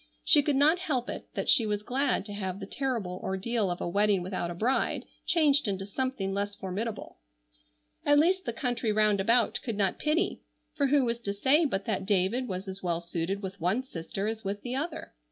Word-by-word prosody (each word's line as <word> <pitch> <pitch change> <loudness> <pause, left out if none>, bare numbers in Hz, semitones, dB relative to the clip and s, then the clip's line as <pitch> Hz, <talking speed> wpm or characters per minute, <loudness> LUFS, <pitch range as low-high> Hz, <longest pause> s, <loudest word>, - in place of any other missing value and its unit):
She 295 - +6
could 290 0 +1
not 305 +6 +4
help 275 -9 -1
it - - -7
that - - -2
she 230 -7 +4
was 210 0 -1
glad 255 -3 0
to 205 - -7
have 190 -2 -4
the - - -5
terrible 230 -10 -3
ordeal 200 +2 -1
of 175 - -3
a - - -2
wedding 200 +1 +2
without 180 -2 -3
a 175 - -5
bride 240 +9 0 0.2
changed 295 -6 +3
into 195 -1 -2
something 205 -3 -2
less 200 +1 -2
formidable. 200 - -5 0.8
At 290 0 +4
least 370 +5 +3
the 235 - -1
country 240 -1 -1
round 210 -1 +3
about 230 +4 +3
could 230 -5 -3
not 195 -3 +1
pity, 305 +3 0 0.3
for 280 - +1
who 275 -1 +3
was 235 0 -1
to 200 -3 -4
say 275 +10 +4
but 195 -9 -1
that 195 -3 -2
David 205 +6 +1
was 190 0 -4
as 190 0 -6
well 170 -2 -1
suited 170 +3 -3
with 190 -1 -6
one 190 +9 +1
sister 195 -3 -5
as 220 0 -3
with 200 +1 -4
the 250 0 -3
other? 305 +4 -4
215 Hz, 210 wpm, -29 LUFS, 195-260 Hz, 0.8 s, She